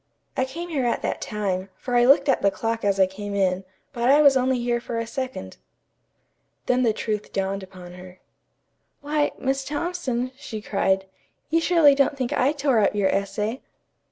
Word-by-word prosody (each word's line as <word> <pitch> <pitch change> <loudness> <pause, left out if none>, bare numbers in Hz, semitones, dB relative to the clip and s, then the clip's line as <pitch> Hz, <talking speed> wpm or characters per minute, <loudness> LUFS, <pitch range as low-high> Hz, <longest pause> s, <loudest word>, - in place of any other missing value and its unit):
I 260 - +1
came 335 +7 -7
here 275 -7 0
at 235 - -1
that - - -2
time, 195 -3 -3
for 250 -2 -3
I 240 0 +5
looked 275 +2 +5
at 270 - +2
the 200 - +4
clock 225 +2 -3
as 200 -1 +1
I 190 - +7
came 200 +2 -6
in, 190 -1 +1 0.3
but 240 -1 0
I 285 +2 +6
was 280 -2 +6
only 260 0 +2
here 240 0 -1
for 235 -1 -5
a 230 - -2
second." 250 - -6 1.1
Then 250 0 +2
the 235 -3 +3
truth 210 -1 -4
dawned 195 0 -2
upon 185 -2 -11
her. 180 0 -12 0.8
"Why, 295 0 0
Miss 270 +1 -1
Thompson," 285 -5 -3
she 220 -5 -7
cried, 195 -2 0 0.5
"you 330 +1 +3
surely 330 -4 +5
don't 275 +1 +1
think 260 +1 -2
I 275 -1 +2
tore 280 -5 +1
up 210 - +2
your 200 -2 +2
essay?" 210 +5 -2
240 Hz, 185 wpm, -24 LUFS, 200-270 Hz, 1.1 s, I